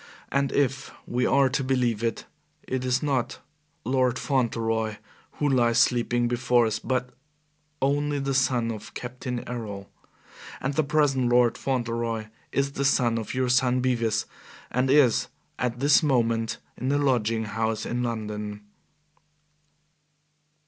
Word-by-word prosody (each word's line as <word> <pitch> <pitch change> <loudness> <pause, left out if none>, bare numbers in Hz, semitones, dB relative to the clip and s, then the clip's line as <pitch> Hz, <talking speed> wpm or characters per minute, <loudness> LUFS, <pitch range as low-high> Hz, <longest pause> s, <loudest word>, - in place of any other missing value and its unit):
And 140 0 +1
if 135 -1 0 0.2
we 125 +1 0
are 140 -1 +4
to 135 +2 -1
believe 125 -4 0
it 115 -2 -2 0.4
it 130 -1 -3
is 130 +2 0
not 135 -5 -1 0.5
Lord 130 0 +1
Fauntleroy 115 -5 0 0.4
who 150 - -1
lies 120 -4 +3
sleeping 120 0 +2
before 120 0 +2
us, 110 0 -1
but 125 -1 -2 0.7
only 145 +1 +1
the 135 0 -1
son 125 -3 +1
of 110 -2 -9
Captain 125 0 -5
Errol. 105 -5 -6 0.7
And 135 +2 -2
the 155 - +2
present 140 -4 +2
Lord 120 -1 +4
Fauntleroy 115 -4 -2 0.2
is 140 0 0
the 140 - -3
son 120 -4 +2
of 110 - -6
your 130 -1 +1
son 125 0 +3
Bevis, 115 -4 0 0.5
and 125 +2 +1
is 135 -4 +4 0.3
at 120 -1 -1
this 145 +4 +5
moment 115 -6 +1 0.2
in 130 +2 -1
a 145 - +2
lodging 115 -5 +1
house 110 0 -2
in 120 +1 -2
London." 105 -3 -4
125 Hz, 135 wpm, -26 LUFS, 115-135 Hz, 0.7 s, this